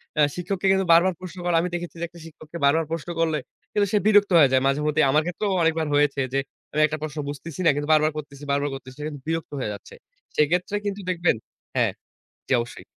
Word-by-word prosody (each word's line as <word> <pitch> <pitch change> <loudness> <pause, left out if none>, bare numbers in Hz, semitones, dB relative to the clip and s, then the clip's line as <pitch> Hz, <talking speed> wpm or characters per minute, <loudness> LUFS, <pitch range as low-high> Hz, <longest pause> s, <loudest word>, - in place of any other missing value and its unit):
অ্যা 150 -1 +5
শিক্ষককে 190 +2 -2
কিন্তু 190 0 +2
বারবার 180 +2 +5
প্রশ্ন 185 0 -8
করে, 175 -1 +2
আমি 180 - -2
দেখেছি, 175 0 -5
যে, - - -4
একটা 170 +1 -15
শিক্ষককে 160 +1 -10
বারবার 160 +3 +3
প্রশ্ন 165 +1 -4
করলে 160 -2 +1 0.4
কিন্তু 205 -1 +2
সে - - +5
বিরক্ত 205 -2 +5
হয়ে 140 -3 +6
যায় 130 0 +4
মাঝেমধ্যেই 150 +1 +2
আমার 155 +2 +3
ক্ষেত্রেও 195 +3 -2
অনেকবার 160 -1 +1
হয়েছে 145 -1 +2
যে, 135 - +2 0.3
আমি 155 - +2
একটা 155 +1 -4
প্রশ্ন 155 0 -5
বুঝতেছি 145 +3 -7
না, - - +7
কিন্তু 145 +1 -3
বারবার 155 0 +4
করতেছি 145 -1 -8
বারবার 140 +1 +1
করতেছি 130 0 -11
কিন্তু 145 -3 -7
বিরক্ত 165 -1 -2
হয়ে 105 - -2
যাচ্ছে। 100 - -11 0.4
সেক্ষেত্রে 175 +6 +1
কিন্তু 200 0 -3
দেখবেন 175 -6 +2 0.4
হ্যাঁ, - - +2 0.6
জি, - - +1
অবশ্যই। 120 - -9
160 Hz, 210 wpm, -24 LUFS, 145-175 Hz, 0.6 s, না